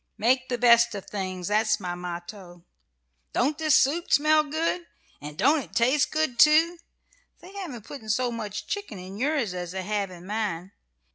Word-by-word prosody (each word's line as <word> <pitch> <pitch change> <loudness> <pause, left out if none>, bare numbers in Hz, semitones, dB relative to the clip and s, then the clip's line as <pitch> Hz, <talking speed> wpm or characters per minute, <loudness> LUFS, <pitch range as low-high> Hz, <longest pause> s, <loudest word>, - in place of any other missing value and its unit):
Make 255 +4 +1
the 245 - -1
best 235 -1 +5
of 200 - -6
things, 185 -3 -5
that's 215 +1 +2
my 180 -3 -4
motto. 175 0 -8 0.7
Don't 285 +5 0
this 310 -2 +3
soup 330 +6 +2
smell 305 +1 +4
good? 330 +3 -2 0.3
And 150 +1 -8
don't 295 +4 +4
it 275 - -10
taste 260 +5 +3
good, 310 -7 -1
too? 325 +4 +5 0.6
They 365 +3 -14
haven't 305 - -7
put 245 -7 -9
so 245 +3 +1
much 215 -3 -5
chicken 405 - -5
in 185 +2 -9
yours 270 -7 0
as 180 -1 -5
they 190 0 -4
have 205 -1 -2
in 180 -1 -12
mine. 195 -3 -3
230 Hz, 170 wpm, -26 LUFS, 190-295 Hz, 0.7 s, best